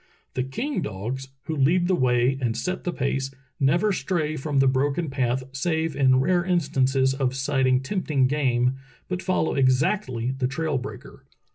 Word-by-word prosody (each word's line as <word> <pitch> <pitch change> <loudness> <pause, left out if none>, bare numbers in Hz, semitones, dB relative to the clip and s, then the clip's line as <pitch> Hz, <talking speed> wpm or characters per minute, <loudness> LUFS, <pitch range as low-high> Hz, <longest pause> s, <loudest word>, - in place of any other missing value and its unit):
The 130 - -1
king 235 - -3
dogs, 115 +7 -4 0.2
who 160 - -3
lead 170 +6 +3
the 190 - +2
way 125 -3 +2
and 115 -2 0
set 185 0 -3
the 175 - 0
pace, 135 -3 -1 0.3
never 170 +9 +3
stray 155 -2 -1
from 145 0 -2
the 135 - +5
broken 140 +4 0
path 130 -1 0
save 160 +3 -1
in 130 -2 +4
rare 175 +6 +2
instances 135 -7 +1
of 135 -1 -1
sighting 130 -1 +2
tempting 150 -4 0
game, 130 -2 +1 0.3
but 185 0 -3
follow 185 -3 0
exactly 130 - +1
the 130 -1 -1
trail 145 +1 -1
breaker. - - -10
135 Hz, 160 wpm, -25 LUFS, 130-160 Hz, 0.3 s, the